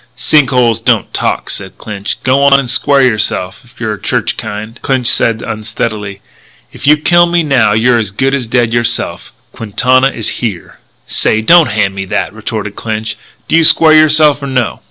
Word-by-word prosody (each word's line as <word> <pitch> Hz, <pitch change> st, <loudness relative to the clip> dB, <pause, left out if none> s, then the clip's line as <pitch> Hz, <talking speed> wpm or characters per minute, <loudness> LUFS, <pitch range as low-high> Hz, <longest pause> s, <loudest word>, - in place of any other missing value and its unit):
"Sink 135 Hz, +1 st, +2 dB
holes 120 Hz, -3 st, +1 dB
don't -, -, 0 dB
talk," -, -, -2 dB
said 95 Hz, -2 st, -7 dB
Clinch. 105 Hz, -1 st, -5 dB
"G'wan 140 Hz, +1 st, +3 dB
and 135 Hz, -, -4 dB
square 140 Hz, +1 st, +2 dB
yourself, 105 Hz, -6 st, -1 dB
if 120 Hz, 0 st, -22 dB
you're 110 Hz, -3 st, -3 dB
the -, -, -23 dB
church -, -, -1 dB
kind." 110 Hz, +2 st, -7 dB
"Clinch," 130 Hz, -2 st, -1 dB
said 115 Hz, -1 st, +2 dB
Smith -, -, -7 dB
unsteadily, 105 Hz, -2 st, -5 dB, 0.5 s
"if 140 Hz, -, -6 dB
you 150 Hz, +1 st, +6 dB
kill 175 Hz, +3 st, +3 dB
me 170 Hz, -1 st, +1 dB
now 130 Hz, -8 st, +2 dB
you're 120 Hz, +2 st, +2 dB
as 105 Hz, -3 st, -2 dB
good 135 Hz, +8 st, -1 dB
as 130 Hz, -4 st, -2 dB
dead 120 Hz, -1 st, 0 dB
yourself. 120 Hz, 0 st, -2 dB, 0.2 s
Quintana 130 Hz, +5 st, +1 dB
is 115 Hz, -5 st, -5 dB
here." 105 Hz, -8 st, -5 dB, 0.3 s
"Say, 110 Hz, -, +1 dB
don't 165 Hz, +7 st, +5 dB
hand 105 Hz, -2 st, 0 dB
me 95 Hz, 0 st, -5 dB
that," -, -, -3 dB
retorted -, -, -6 dB
Clinch. 110 Hz, -1 st, -4 dB, 0.3 s
"Do -, -, +1 dB
you 165 Hz, -, +4 dB
square 155 Hz, 0 st, +5 dB
yourself 155 Hz, -1 st, +4 dB
or 140 Hz, -, -5 dB
no?" 125 Hz, -3 st, -2 dB
120 Hz, 185 wpm, -12 LUFS, 110-140 Hz, 0.5 s, you